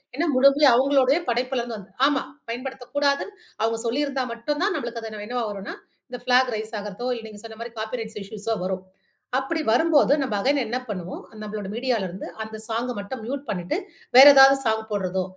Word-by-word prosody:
ஏன்னா 335 Hz, +3 st, 0 dB
முழுமையா 275 Hz, +2 st, +6 dB
அவுங்களுடைய 270 Hz, +2 st, +4 dB
படைப்பில 250 Hz, +1 st, 0 dB
இருந்து 235 Hz, -2 st, -5 dB
வந்த 200 Hz, -1 st, -13 dB, 0.2 s
ஆமா. 285 Hz, -2 st, +1 dB, 0.3 s
பயன்படுத்தக்கூடாது. 270 Hz, +3 st, -1 dB, 0.4 s
அவுங்க 225 Hz, 0 st, 0 dB
சொல்லியிருந்தா 275 Hz, +1 st, -1 dB
மட்டும் 295 Hz, +7 st, -3 dB
தான் 400 Hz, 0 st, +1 dB
நம்மளுக்கு 240 Hz, -3 st, -5 dB
அது 225 Hz, -, -7 dB, 0.2 s
என்னவா 245 Hz, -1 st, -2 dB
வருன்னா, 200 Hz, 0 st, -7 dB, 0.3 s
இந்த 245 Hz, -, -6 dB
ஃபிளாக் 250 Hz, -1 st, +3 dB
ரைஸ் 220 Hz, +1 st, -6 dB
ஆகுறதோ! 210 Hz, +4 st, -6 dB
இல்ல, 225 Hz, -, -8 dB
நீங்க 205 Hz, -1 st, -12 dB
சொன்னமாரி 230 Hz, +1 st, -8 dB
காப்பி 225 Hz, +2 st, -4 dB
ரைட்ஸ் 220 Hz, -1 st, -7 dB
இஷ்யூஸ் 205 Hz, +1 st, -10 dB
ஓ -, -, -1 dB
வரும். 185 Hz, 0 st, -3 dB, 0.5 s
அப்பிடி 315 Hz, +5 st, -1 dB
வரும்போது 295 Hz, 0 st, +4 dB
நம்ம 250 Hz, -6 st, -1 dB
அகைன் 280 Hz, +5 st, +2 dB
என்ன 245 Hz, +3 st, -1 dB
பண்ணுவோம், 185 Hz, -3 st, -6 dB, 0.2 s
நம்மளோட 210 Hz, -2 st, -5 dB
மீடியால 235 Hz, -4 st, 0 dB
இருந்து 185 Hz, +2 st, -7 dB, 0.2 s
அந்த 220 Hz, 0 st, -8 dB
சாங்க 235 Hz, +2 st, -1 dB
மட்டும் 200 Hz, +6 st, -6 dB
மியூட் 275 Hz, +4 st, -4 dB
பண்ணிட்டு, 180 Hz, -, -2 dB, 0.4 s
வேற 270 Hz, -, +12 dB
ஏதாவது 270 Hz, 0 st, +9 dB
சாங் 220 Hz, 0 st, 0 dB
போட்றதோ! 190 Hz, -2 st, -1 dB
240 Hz, 180 wpm, -24 LUFS, 215-270 Hz, 0.5 s, வேற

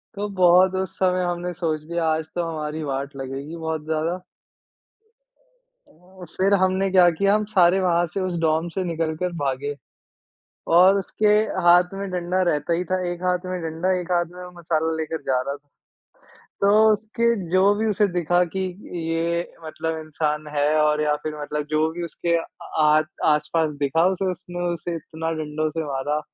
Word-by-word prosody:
तो 205 Hz, +1 st, -3 dB
बहुत 180 Hz, +1 st, +6 dB
उस 190 Hz, -1 st, -3 dB
समय 185 Hz, -1 st, +2 dB
हमने 175 Hz, 0 st, -3 dB
सोच 160 Hz, -3 st, -2 dB
लिया 170 Hz, +1 st, -3 dB
आज 160 Hz, 0 st, 0 dB
तो 175 Hz, -, 0 dB
हमारी 155 Hz, 0 st, -4 dB
वाट 140 Hz, 0 st, -4 dB
लगेगी 135 Hz, +4 st, -6 dB
बहुत 160 Hz, -1 st, -3 dB
ज़्यादा। 160 Hz, +3 st, -1 dB, 1.7 s
उम, 180 Hz, +2 st, -15 dB
फिर 195 Hz, +2 st, +3 dB
हमने 190 Hz, +1 st, +2 dB
क्या 180 Hz, -2 st, +6 dB
किया, 200 Hz, +5 st, +2 dB
हम 215 Hz, 0 st, +1 dB
सारे 180 Hz, 0 st, +5 dB
वहाँ 175 Hz, -1 st, +2 dB
से 185 Hz, +4 st, -4 dB
उस 185 Hz, -2 st, -2 dB
डोम 160 Hz, +1 st, +1 dB
से 190 Hz, -, -1 dB
निकल 165 Hz, -2 st, -2 dB
कर 180 Hz, +1 st, -2 dB
भागे। 140 Hz, +1 st, -2 dB, 1.0 s
और 190 Hz, +2 st, +7 dB
उसके 210 Hz, +2 st, -1 dB, 0.4 s
हाथ 180 Hz, +2 st, +5 dB
में 195 Hz, 0 st, -4 dB
डंडा 180 Hz, +1 st, -1 dB
रहता 150 Hz, +3 st, -1 dB
ही 175 Hz, +2 st, 0 dB
था, 185 Hz, 0 st, +1 dB
1 175 Hz, +1 st, -7 dB
हाथ 180 Hz, 0 st, 0 dB
में 185 Hz, -1 st, -4 dB
डंडा, 165 Hz, +3 st, -1 dB
1 180 Hz, 0 st, -6 dB
हाथ 175 Hz, -1 st, +2 dB
में 180 Hz, 0 st, -8 dB
मसाला 160 Hz, -1 st, -1 dB
लेकर 160 Hz, 0 st, -3 dB
जा 130 Hz, -1 st, +2 dB
रहा 140 Hz, +2 st, -4 dB
था। -, -, -14 dB, 1.0 s
तो 200 Hz, 0 st, +4 dB, 0.2 s
उसके 220 Hz, +2 st, -2 dB, 0.3 s
जो 185 Hz, +1 st, +4 dB
भी 220 Hz, +2 st, -1 dB
उसे 205 Hz, +1 st, +2 dB
दिखा 175 Hz, 0 st, +1 dB
कि 190 Hz, -, -1 dB, 0.5 s
ये 170 Hz, +1 st, 0 dB, 0.2 s
मतलब 160 Hz, +1 st, -4 dB
इंसान 155 Hz, -1 st, -2 dB
है 145 Hz, 0 st, +2 dB
और 150 Hz, 0 st, +2 dB
या 150 Hz, -1 st, +2 dB
फिर 150 Hz, -1 st, -5 dB
मतलब 150 Hz, 0 st, -3 dB
जो 155 Hz, +1 st, +2 dB
भी 175 Hz, +1 st, -5 dB
उसके 170 Hz, +1 st, -1 dB
आ -, -, -5 dB, 0.4 s
आस 155 Hz, 0 st, +5 dB, 0.2 s
आस-पास 155 Hz, +1 st, +2 dB
दिखा, 145 Hz, +4 st, +2 dB
उसे 190 Hz, 0 st, -1 dB
उसने 175 Hz, 0 st, -5 dB
उसे 170 Hz, +1 st, -5 dB
इतना 160 Hz, 0 st, -5 dB
डंडों 155 Hz, +1 st, -2 dB
से 160 Hz, 0 st, -3 dB
मारा। 145 Hz, +2 st, -1 dB
170 Hz, 180 wpm, -23 LUFS, 155-180 Hz, 1.7 s, और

